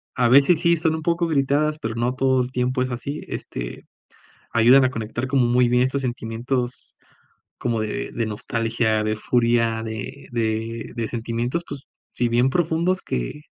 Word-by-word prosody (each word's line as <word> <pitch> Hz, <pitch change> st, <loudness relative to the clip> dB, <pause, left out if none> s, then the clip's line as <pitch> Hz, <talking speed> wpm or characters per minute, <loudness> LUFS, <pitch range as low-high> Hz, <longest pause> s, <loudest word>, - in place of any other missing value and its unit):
a 125 Hz, -2 st, +3 dB
veces 140 Hz, +6 st, +6 dB
sí 170 Hz, 0 st, +4 dB
son 160 Hz, 0 st, +1 dB
un 160 Hz, -, -4 dB
poco 170 Hz, +1 st, 0 dB
gritadas, 150 Hz, 0 st, +1 dB
pero 110 Hz, 0 st, -4 dB
no 120 Hz, +2 st, 0 dB
todo 130 Hz, 0 st, +2 dB
el 125 Hz, -, -4 dB
tiempo 125 Hz, +1 st, 0 dB
es 130 Hz, 0 st, -1 dB
así. 140 Hz, +5 st, -4 dB
Este, -, -, -6 dB, 0.7 s
ayudan 125 Hz, +4 st, +6 dB
a 130 Hz, -, +2 dB
conectar 115 Hz, +1 st, -4 dB
como 130 Hz, -1 st, +2 dB
muy 120 Hz, 0 st, +3 dB
bien 125 Hz, +1 st, +3 dB
estos 130 Hz, +2 st, 0 dB
sentimientos 120 Hz, +1 st, -3 dB, 0.6 s
como 115 Hz, -2 st, -1 dB
de 110 Hz, +5 st, -3 dB
de 115 Hz, -, -1 dB
nostalgia, 110 Hz, 0 st, -1 dB
de 110 Hz, 0 st, 0 dB
furia, 115 Hz, -1 st, +1 dB
de 115 Hz, +5 st, -6 dB
de 115 Hz, 0 st, -2 dB
de 115 Hz, -2 st, -2 dB
sentimientos, 120 Hz, +7 st, -2 dB
pues 140 Hz, -1 st, -6 dB, 0.3 s
sí, 120 Hz, -, +1 dB
bien 120 Hz, +2 st, +3 dB
profundos, 170 Hz, +4 st, 0 dB
que 60 Hz, -, -4 dB
125 Hz, 170 wpm, -23 LUFS, 115-135 Hz, 0.7 s, veces